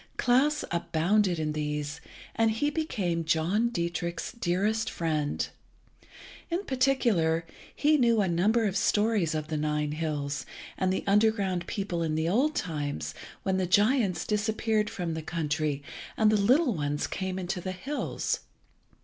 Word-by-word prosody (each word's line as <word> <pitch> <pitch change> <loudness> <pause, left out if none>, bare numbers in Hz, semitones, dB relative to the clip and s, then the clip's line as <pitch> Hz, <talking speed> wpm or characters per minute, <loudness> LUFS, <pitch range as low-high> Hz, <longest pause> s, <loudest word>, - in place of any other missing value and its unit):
Klas 270 +5 +3
abounded 175 +3 +1
in 155 -1 -1
these, 150 0 -3 0.3
and 225 0 +3
he 260 +7 0
became 200 - -1
John 170 +9 +1
Dietrich's 170 -3 -3
dearest 215 +1 0
friend. 155 -3 -1 1.0
In 350 +3 -1
particular, 235 -12 +2 0.3
he 300 +1 +4
knew 235 -3 +4
a 200 - +2
number 210 +7 +2
of 195 -2 -1
stories 205 -4 +2
of 155 0 -3
the 155 - -1
Nine 150 0 0
hills, 150 -2 -2 0.3
and 185 0 0
the 190 - -1
underground 200 -4 +2
people 195 -4 -2
in 160 -2 0
the 160 +1 0
old 265 - +2
times, 145 -4 -3 0.3
when 190 -1 +1
the 185 -1 0
giants 205 0 +3
disappeared 215 0 0
from 175 -3 -3
the 160 - -3
country 155 -3 -2 0.3
and 215 -1 +4
the - - +4
little 250 +7 +4
ones 145 -3 -1
came 190 -1 -3
into 180 0 -3
the 185 - -3
hills. 270 +11 -2
185 Hz, 145 wpm, -28 LUFS, 160-220 Hz, 1.0 s, he